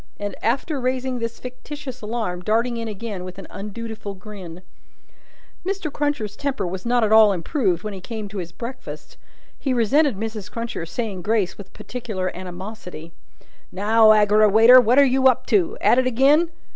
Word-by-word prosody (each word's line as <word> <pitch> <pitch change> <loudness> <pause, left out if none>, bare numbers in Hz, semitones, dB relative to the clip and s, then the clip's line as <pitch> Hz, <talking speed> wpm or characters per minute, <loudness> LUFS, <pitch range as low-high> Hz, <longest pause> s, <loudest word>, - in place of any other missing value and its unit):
and, 205 0 -4
after 270 +5 -1
raising 255 0 -1
this 230 0 -4
fictitious 260 +1 -8
alarm, 210 -5 -3
darting 230 +5 0
in 230 0 -4
again 210 -3 -6
with 185 0 -9
an 195 - -9
undutiful 210 0 -7
grin. 185 -3 -10 1.0
Mr. 375 -6 -3
Cruncher's 285 -9 -2
temper 270 -7 -2
was 185 +4 -5
not 240 -1 +2
at 215 - +1
all 220 -1 +7
improved 190 - -1
when 210 -1 -4
he 190 - -8
came 215 +1 -6
to 200 0 -6
his 175 -2 -6
breakfast. 235 +8 -8 0.4
He 265 -3 -1
resented 255 +2 +2
Mrs. 215 -2 -5
Cruncher's 215 -7 -5
saying 215 -6 -3
grace 210 -2 0
with 195 -2 -12
particular 215 -7 -5
animosity. 180 -2 -8 0.6
"Now, 215 +3 +4
Aggerawayter! 215 +3 +6
What 245 +2 +2
are 280 - +8
you 265 0 +3
up 255 - +2
to? 395 +2 +2
At 245 - +4
it 255 - +1
again?" 280 +7 +4
220 Hz, 165 wpm, -22 LUFS, 200-255 Hz, 1.0 s, are